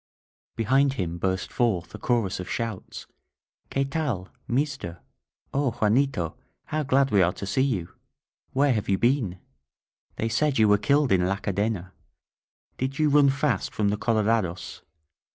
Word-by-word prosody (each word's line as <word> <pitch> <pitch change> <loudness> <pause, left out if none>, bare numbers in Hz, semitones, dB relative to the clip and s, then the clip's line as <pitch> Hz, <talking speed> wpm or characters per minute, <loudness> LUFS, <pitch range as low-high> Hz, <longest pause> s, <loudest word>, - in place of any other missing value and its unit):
Behind 135 +5 +3
him 85 -7 -3
burst 95 0 -1
forth 105 -8 0
a - - -8
chorus 115 -8 0
of 90 - -6
shouts: 115 -5 -4 0.6
QtLe 135 0 -1
tal! 130 - -2 0.2
Meester! 130 - -2 0.5
O 140 -1 +2
Juanito, 110 - +1 0.3
how 155 0 -2
glad 135 -2 +2
we 100 -2 +5
are 90 0 +3
to - - -6
see 130 - 0
you! 115 -11 0 0.6
Where 140 0 +3
have 105 -3 -2
you 95 - +3
been? 120 -6 +1 0.8
They 115 - -1
said 135 +5 +1
you 110 -1 +5
were 105 -1 +4
killed 140 +2 +2
in 90 -2 +3
La 100 - +1
Cadena! 100 -2 -2 0.9
Did 130 +2 -2
you 155 -1 +3
run 145 -1 +5
fast 135 -6 0
from 105 -2 +1
the 105 - 0
colorados? 110 -5 0
115 Hz, 150 wpm, -26 LUFS, 95-135 Hz, 0.9 s, we